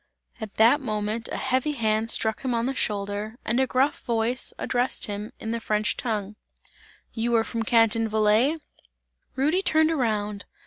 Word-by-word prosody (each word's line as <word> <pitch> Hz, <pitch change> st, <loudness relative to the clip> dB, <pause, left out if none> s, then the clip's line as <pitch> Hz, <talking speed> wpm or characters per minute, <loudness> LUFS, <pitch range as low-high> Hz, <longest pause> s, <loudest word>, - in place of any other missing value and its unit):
At 215 Hz, -2 st, -7 dB
that 235 Hz, +7 st, +5 dB
moment 215 Hz, -1 st, -3 dB
a -, -, -3 dB
heavy 265 Hz, +3 st, 0 dB
hand 220 Hz, -3 st, 0 dB
struck 220 Hz, -1 st, +1 dB
him 255 Hz, -2 st, -1 dB
on 230 Hz, 0 st, 0 dB
the 270 Hz, -, -1 dB
shoulder, 205 Hz, 0 st, -2 dB
and 235 Hz, +3 st, +1 dB
a 265 Hz, -, +2 dB
gruff 265 Hz, +3 st, +1 dB
voice 235 Hz, +2 st, 0 dB
addressed 245 Hz, +1 st, 0 dB
him 205 Hz, +1 st, -5 dB
in 220 Hz, -, -4 dB
the 230 Hz, -, -1 dB
French 210 Hz, -1 st, 0 dB
tongue: 210 Hz, -3 st, -3 dB, 0.8 s
"You 235 Hz, +1 st, 0 dB
are 225 Hz, -, +4 dB
from 230 Hz, 0 st, -4 dB
Canton 225 Hz, 0 st, +3 dB
Valais?" 220 Hz, +8 st, +3 dB, 0.8 s
Rudy 300 Hz, +8 st, +2 dB
turned 315 Hz, -3 st, +3 dB
around. 210 Hz, -8 st, -1 dB
225 Hz, 165 wpm, -25 LUFS, 215-255 Hz, 0.8 s, that